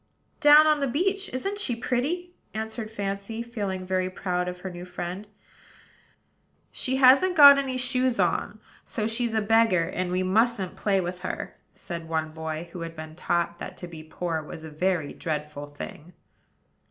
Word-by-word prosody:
"Down 295 +1 +8
on 305 -1 +4
the 280 - 0
beach. 390 +9 0
Isn't 390 +11 -3
she 250 - 0
pretty?" 300 +10 -2 0.2
answered 220 0 -4
Fancy, 200 +1 -4
feeling 200 -6 -4
very 185 0 0
proud 180 -1 -2
of 180 0 -6
her 190 - -5
new 175 0 -8
friend. 180 +2 -6 1.4
"She 260 - -1
hasn't 270 +8 +6
got 285 -2 +10
any 265 -2 -2
shoes 255 0 +1
on; - - 0 0.2
so 215 - -3
she's 230 +1 -1
a 220 - +2
beggar, 225 -4 +4
and 180 0 -2
we 185 +1 +1
mustn't 210 0 +1
play 195 -2 +1
with 180 0 -4
her," 185 - -5 0.2
said 170 -3 -7
one 160 -1 -1
boy, 160 +1 -5
who 175 - -6
had 165 0 -6
been 155 0 -8
taught 170 0 -1
that - - -7
to 180 - -7
be 165 -2 -9
poor 160 0 -3
was 155 +1 -9
a 160 - -8
very 170 -1 -1
dreadful 150 -2 -4
thing. 145 +3 -9
190 Hz, 170 wpm, -26 LUFS, 175-250 Hz, 1.4 s, got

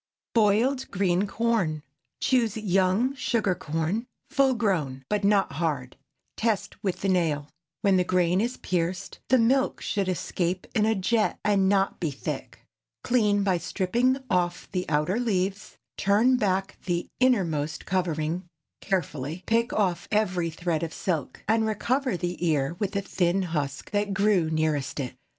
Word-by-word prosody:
BOILED 235 +5 +2
GREEN 190 0 +1
CORN. 195 -9 0 0.4
Choose 230 -5 +2
young 195 +4 +2
sugar 230 -7 0
corn, 175 +6 -2 0.2
full 275 -3 +3
grown, 155 - -1
but 210 -1 0
not 200 -3 +3
hard; 140 -4 -2 0.4
test 215 -2 -1
with 190 -3 -2
the 195 - 0
nail. 160 -6 +1 0.3
When 195 -2 +4
the 180 - +3
grain 180 +1 +2
is 240 +3 -2
pierced, 180 +2 -2
the 260 - +6
milk 260 +3 +2
should 200 -4 -1
escape 180 0 -2
in 215 -2 +2
a 220 - +2
jet, 215 +3 +1
and 195 -2 +3
not 195 -1 +1
be 165 - 0
thick. 140 - -6 0.4
Clean 210 -5 +2
by 185 -3 +2
stripping 235 +10 +1
off 175 -3 0
the 180 -1 -2
outer 155 +8 +1
leaves, 200 -4 -1 0.2
turn 215 +6 +4
back 195 -4 -1
the 175 -1 -1
innermost 170 - +1
covering 175 -1 -1 0.3
carefully, 165 -3 -2
pick 230 +1 +1
off 180 -5 0
every 185 -5 +1
thread 165 -1 -2
of 165 -1 -4
silk, 165 -7 -3
and 220 +1 +2
recover 245 +2 0
the 175 0 -3
ear 155 -2 +1
with 200 -1 -1
the 200 - 0
thin 190 -1 0
husk 145 -5 -3
that 205 -1 0
grew 195 -5 +3
nearest 155 -3 -1
it. 130 -3 -3
190 Hz, 150 wpm, -26 LUFS, 170-215 Hz, 0.4 s, the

